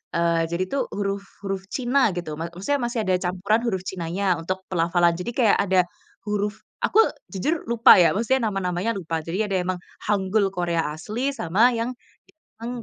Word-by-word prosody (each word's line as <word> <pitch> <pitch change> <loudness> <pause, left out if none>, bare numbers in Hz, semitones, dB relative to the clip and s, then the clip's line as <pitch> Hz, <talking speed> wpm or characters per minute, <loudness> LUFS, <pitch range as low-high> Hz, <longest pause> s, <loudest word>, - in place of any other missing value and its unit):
eee, 170 -1 +2
jadi 170 +2 0
tuh 280 - +1
huruf 200 0 -2 0.2
huruf 195 -1 -3
China 255 -2 +2
gitu. 170 -4 -4
Ma 165 - -3
maksudnya 195 +12 -1
masih 240 -1 -1
ada 185 - +3
campuran 190 +5 +1
huruf 190 -5 -1
China-nya 185 +2 -1
untuk 185 +3 -4
pelafalan, 175 0 +3
jadi 180 +6 -3
kayak 230 -6 +4
ada 190 -2 +4 0.5
huruf 210 0 -1 0.2
aku, 435 - +3 0.3
jujur 300 - -1
lupa 235 -1 +7
ya, 170 - +5
maksudnya 235 +3 +1
nama-namanya 185 +2 -1
lupa. 165 -3 -3
Jadi 170 +5 -4
ada 195 - -1
emang 185 0 -2 0.3
hanggul 200 0 +1
Korea 170 -2 0
asli 225 - -2
sama 210 +8 +3
yang, 230 +2 -1 0.7
emang, 240 0 -4
195 Hz, 170 wpm, -24 LUFS, 175-225 Hz, 0.7 s, lupa